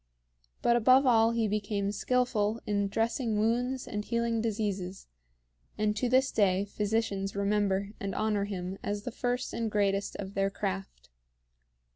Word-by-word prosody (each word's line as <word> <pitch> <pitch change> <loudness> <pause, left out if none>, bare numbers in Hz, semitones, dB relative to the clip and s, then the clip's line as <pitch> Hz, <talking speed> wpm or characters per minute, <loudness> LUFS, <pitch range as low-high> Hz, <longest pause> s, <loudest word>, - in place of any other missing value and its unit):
But 235 - +4
above 255 +4 +5
all 225 -3 +5
he 230 -1 +1
became 205 -1 -1
skillful 225 -1 0
in 200 -1 0
dressing 225 +2 0
wounds 245 +4 0
and 210 -1 -3
healing 235 0 0
diseases; 200 -4 -3 0.7
and 210 0 +1
to 240 +3 0
this 260 +1 +3
day 195 -2 +2
physicians 205 -1 -1
remember 200 -1 +1
and 195 -1 -4
honor 210 -2 0
him 190 -1 -5
as 205 0 -3
the 245 - -4
first 245 +1 -2
and 230 -1 -1
greatest 200 -1 0
of 195 0 -6
their 195 0 +1
craft. 95 - -5
210 Hz, 145 wpm, -30 LUFS, 200-230 Hz, 0.7 s, above